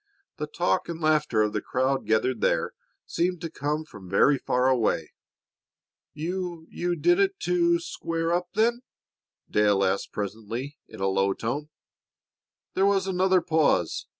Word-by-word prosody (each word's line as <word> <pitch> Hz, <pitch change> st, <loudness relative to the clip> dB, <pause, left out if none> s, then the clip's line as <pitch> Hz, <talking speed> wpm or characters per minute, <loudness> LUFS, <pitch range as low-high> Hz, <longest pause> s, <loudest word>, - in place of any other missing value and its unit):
The 150 Hz, -1 st, -3 dB
talk 175 Hz, +3 st, 0 dB
and 165 Hz, -1 st, -4 dB
laughter 150 Hz, -8 st, +2 dB
of 105 Hz, 0 st, -1 dB
the -, -, -1 dB
crowd 130 Hz, +1 st, -1 dB
gathered 110 Hz, +2 st, +1 dB
there -, -, +1 dB, 0.3 s
seemed 180 Hz, +1 st, -1 dB
to 165 Hz, -2 st, -5 dB
come 150 Hz, +1 st, -2 dB
from 95 Hz, -10 st, -12 dB
very 135 Hz, +8 st, +4 dB
far 125 Hz, +1 st, +1 dB
away. 125 Hz, -4 st, +1 dB, 1.0 s
"You 170 Hz, +1 st, -4 dB, 0.3 s
did 350 Hz, +1 st, +4 dB
it 395 Hz, 0 st, +1 dB
to 345 Hz, -4 st, +2 dB
to -, -, 0 dB
square 165 Hz, -, -2 dB
up, 175 Hz, 0 st, 0 dB
then?" 235 Hz, +3 st, +2 dB, 0.7 s
Dale 105 Hz, -2 st, +3 dB
asked 95 Hz, +1 st, 0 dB
presently 115 Hz, +7 st, -5 dB
in -, -, -11 dB
a 95 Hz, -, +2 dB
low 95 Hz, 0 st, +2 dB
tone. 140 Hz, +9 st, -4 dB, 1.0 s
There 195 Hz, +1 st, +3 dB
was 195 Hz, -1 st, +2 dB
another 185 Hz, -1 st, +2 dB
pause. 155 Hz, -, +1 dB
150 Hz, 150 wpm, -26 LUFS, 115-180 Hz, 1.0 s, very